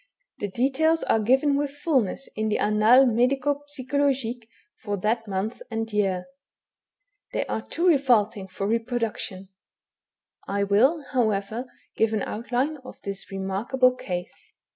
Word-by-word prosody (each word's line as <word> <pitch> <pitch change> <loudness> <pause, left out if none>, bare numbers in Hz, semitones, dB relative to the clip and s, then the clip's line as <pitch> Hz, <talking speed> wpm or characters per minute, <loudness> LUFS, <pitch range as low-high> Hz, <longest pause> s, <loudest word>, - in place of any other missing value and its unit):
The 205 - -2
details 275 - +1
are 225 - +2
given 265 +6 +3
with 285 0 0
fulness 275 - -1
in 220 0 -1
the 210 - +1
Annates 215 +5 +5
Medico 270 +5 +1
psychologiques 260 -4 -1 0.3
for 205 -1 -2
that 225 +4 -1
month 200 +4 -3
and 225 -1 -3
year. 190 -3 0 1.1
They - - 0
are 220 - -3
too 335 +9 -3
revolting 240 - +3
for 190 +1 -4
reproduction. 225 -4 -2 1.0
I 200 +1 0
will, 255 +11 +3
however, 220 -1 0 0.3
give 225 0 +2
an 215 - 0
outline 250 +7 -2
of 260 -2 -12
this 200 0 -6
remarkable 205 +7 +1
case. 180 -7 -5
230 Hz, 130 wpm, -25 LUFS, 205-265 Hz, 1.1 s, Annates